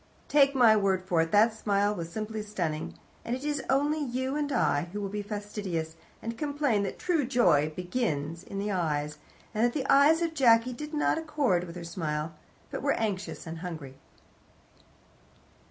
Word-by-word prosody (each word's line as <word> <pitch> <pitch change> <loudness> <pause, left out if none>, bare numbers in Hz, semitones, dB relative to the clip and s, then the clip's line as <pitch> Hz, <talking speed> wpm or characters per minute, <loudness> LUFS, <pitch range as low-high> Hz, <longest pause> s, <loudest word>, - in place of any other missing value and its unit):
Take 280 -1 +4
my 235 -4 +6
word 195 -3 +1
for 180 -3 +2
it, 165 0 -1
that 220 +2 +5
smile 205 -1 +1
was 170 -4 -6
simply 215 +2 -4
stunning, 175 -7 -3 0.3
and 235 - -2
it 260 +3 -7
is 295 -2 -1
only 290 +3 +2
you 260 +1 -2
and 295 -1 -1
I 150 - +1
who 205 - -4
will 200 -1 -3
be 210 +1 -3
fastidious, 205 -6 -4 0.3
and 230 0 -5
complain 285 -7 +1
that 200 - -3
true 340 -5 +1
joy 175 - +3
begins 170 - -2
in 200 -1 -7
the 205 +1 -1
eyes, 150 -4 -1 0.3
and 215 - +1
that 240 0 +3
the 275 -3 -2
eyes 310 +4 +5
of 330 -1 -1
Jacky 245 -4 +4
did 300 +4 -6
not 300 +1 +2
accord 285 - 0
with 170 0 -9
her 175 - -6
smile, 160 -2 -3 0.4
but - - -4
were - - +2
anxious 200 -5 -3
and 165 0 -6
hungry. 160 -7 -6
210 Hz, 180 wpm, -29 LUFS, 170-265 Hz, 0.4 s, my